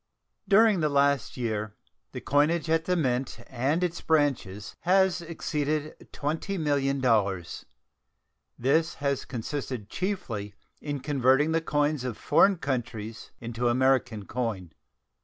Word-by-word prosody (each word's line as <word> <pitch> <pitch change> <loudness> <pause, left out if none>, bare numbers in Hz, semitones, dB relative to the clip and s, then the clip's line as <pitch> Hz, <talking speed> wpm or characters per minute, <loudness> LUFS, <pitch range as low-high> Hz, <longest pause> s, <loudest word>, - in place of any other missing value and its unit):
During 210 0 +5
the 155 -2 +1
past 140 -3 +1
year 110 -3 -3 0.4
the - - -6
coinage 155 +3 +2
at 165 0 +2
the 180 - +1
Mint 130 -6 -1
and 135 +8 0
its 175 -1 -2
branches 125 -11 0
has 190 0 +3
exceeded 155 -2 -3
$20,000,000. 135 - 0 0.9
This 160 +6 +1
has 140 -1 -1
consisted 125 -3 -5
chiefly 115 - -3 0.3
in 145 -2 -4
converting 140 +2 +3
the 165 0 +2
coins 145 -3 0
of 125 -4 -4
foreign 190 +6 +4
countries 120 -6 -4
into 120 +1 -2
American 125 -4 +2
coin. 105 -9 -3
140 Hz, 115 wpm, -27 LUFS, 120-160 Hz, 0.9 s, During